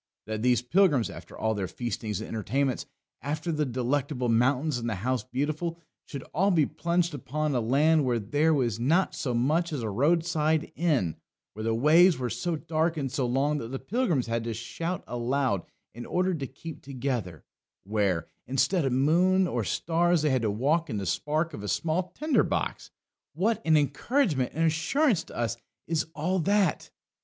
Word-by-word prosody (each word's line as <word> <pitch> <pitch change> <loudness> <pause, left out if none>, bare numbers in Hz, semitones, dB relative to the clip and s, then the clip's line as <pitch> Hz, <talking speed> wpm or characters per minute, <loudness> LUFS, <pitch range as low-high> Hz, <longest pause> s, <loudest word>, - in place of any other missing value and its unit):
That 110 0 -4
these 125 -1 +3
pilgrims, 145 - +3
after - - -11
all 110 0 0
their 100 -3 -2
feastings 110 -4 -4
and - - -6
entertainments 125 +5 -1 0.3
after 155 +4 -3
the 150 -2 0
Delectable 130 +1 -1
Mountains 125 +4 +2
and 120 0 -3
the 110 - -1
House 125 +4 -1
Beautiful 155 +7 -2 0.3
should 140 -3 -6
all 195 +5 +3
be 165 -6 +4
plunged 170 +2 0
upon 150 +2 -2
a 125 - +1
land 145 +7 +3
where 125 -2 +1
there 145 +9 +1
was 120 -7 +1
not 165 +10 +2
so 125 -3 -2
much 155 +8 +1
as 140 -6 -3
a 110 - -2
roadside 155 - +1
inn, 140 - +1 0.4
where 110 - -7
the 115 0 +1
ways 165 +8 +5
were 125 -2 -3
so 175 -2 -2
dark 160 +1 -1
and 135 -4 -2
so 125 -1 0
long 140 +4 +1
that 115 - -5
the 135 +3 -4
pilgrims 175 - 0
had 115 0 -2
to 115 -1 -3
shout 165 +10 -4
aloud 120 -4 -1 0.3
in 120 +1 -8
order 185 +1 +1
to 140 -5 -3
keep 150 +5 -9
together, 125 - -4 0.4
where, 100 -5 0 0.2
instead 155 +7 +1
of 135 - +1
moon 175 +8 +3
or 120 -8 -1
stars, 170 - +1
they 150 - +2
had 130 -2 +2
to 110 - +1
walk 145 +11 +1
in 110 - -2
the 100 - -3
spark 155 - -1
of 105 - -6
a 105 - -5
small 170 - -1
tinder 305 -1 +2
box - - -2 0.5
what 215 +7 +1
an 160 -1 +4
encouragement 150 - +1
and 165 +1 +2
assurance 190 - +2
to - - -12
us 120 0 -1 0.3
is 160 -1 -1
all 180 +5 0
that! 195 0 +1
145 Hz, 185 wpm, -27 LUFS, 120-165 Hz, 0.5 s, ways